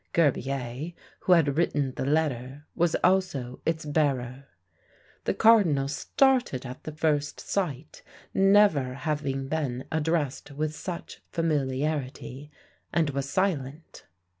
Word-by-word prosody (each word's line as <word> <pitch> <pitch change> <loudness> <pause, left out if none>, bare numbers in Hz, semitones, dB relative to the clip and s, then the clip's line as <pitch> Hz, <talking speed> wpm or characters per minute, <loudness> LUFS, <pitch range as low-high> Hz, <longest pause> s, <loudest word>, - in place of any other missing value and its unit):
Gerbier, 140 0 0 0.2
who 185 - +4
had 150 -4 +3
written 145 -5 +1
the - - -3
letter, 145 -2 -1
was 175 -1 +1
also 180 -10 +1
its 160 -1 0
bearer. 140 -3 0 0.8
The - - 0
cardinal 185 -12 +5
started 245 - +1
at 125 0 -8
the 155 - -4
first 150 -2 0
sight, 155 -7 -3 0.3
never 195 -10 +4
having 140 -2 -2
been 135 -4 -2
addressed 160 -3 -1
with 150 +2 -3
such 175 +2 -7
familiarity, 145 -2 -2 0.4
and 160 -4 +1
was 140 0 -3
silent. 155 -4 -2
150 Hz, 115 wpm, -27 LUFS, 135-165 Hz, 0.8 s, cardinal